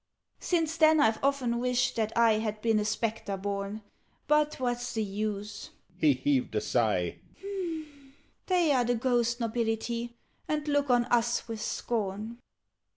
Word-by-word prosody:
"Since 330 -2 0
then 315 -1 +6
I've 225 -5 +2
often 260 -4 +1
wished 250 0 +1
that 220 -1 0
I 225 -2 +5
Had 215 -1 -3
been 225 -1 +2
a 210 - -1
Spectre 215 -2 -2
born. 200 +2 -4 0.4
But 300 0 +2
what's 245 -1 -2
the 220 - 0
use?" 205 0 -4 0.3
(He 155 -5 +4
heaved 130 -3 0
a 105 - +1
sigh). 105 -8 0 1.3
"They 355 -4 +3
are 255 -3 +3
the 245 +1 +1
ghost 240 0 +1
nobility, 235 +1 -2 0.3
And 305 0 -2
look 285 -1 +1
on 245 -1 +4
us 240 -1 +1
with 225 -2 -5
scorn. 220 +1 -3
230 Hz, 145 wpm, -29 LUFS, 210-250 Hz, 1.3 s, then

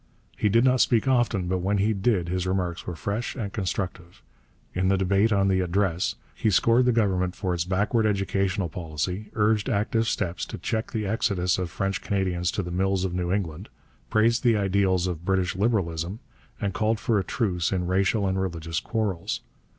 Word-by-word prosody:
He 105 - +1
did 115 +4 +4
not 130 -1 +4
speak 115 +1 +3
often, 120 -8 +2
but 95 +1 0
when 100 +3 0
he 105 +3 +2
did 95 -3 +1
his 90 +1 -1
remarks 90 -2 -2
were 90 - -3
fresh 100 +8 -3
and 105 -7 -4
constructive. 90 -1 -4 0.5
In 95 +1 0
the 95 0 +3
debate 100 +3 +2
on 100 -1 +3
the 95 -1 +2
Address 90 -1 0 0.2
he 110 - 0
scored 115 +5 +4
the 125 - +4
Government 95 -5 +1
for 90 -2 -2
its 85 -1 -1
backward 105 +4 +1
educational 95 -1 0
policy, 90 +5 -4
urged 105 -1 +2
active 110 +2 +1
steps 90 -6 -1
to - - -6
check 110 0 -2
the 110 -2 -2
exodus 95 -4 +1
of 90 -2 -2
French 95 +2 -2
Canadians 90 -3 0
to 100 +1 -2
the 90 - -6
mills 95 +1 +1
of 90 - -3
New 90 -1 -1
England, 95 -1 -3 0.4
praised 115 +3 +3
the 115 -3 +4
ideals 95 -2 +2
of 85 -3 -3
British 95 -1 0
Liberalism, 95 -4 0 0.4
and 100 -2 -2
called 110 +2 +1
for 110 -3 +1
a - - -1
truce 90 -3 -1
in 90 -2 0
racial 95 +3 +1
and 95 0 0
religious 85 -3 -2
quarrels. 105 -4 -2
95 Hz, 190 wpm, -26 LUFS, 90-105 Hz, 0.5 s, did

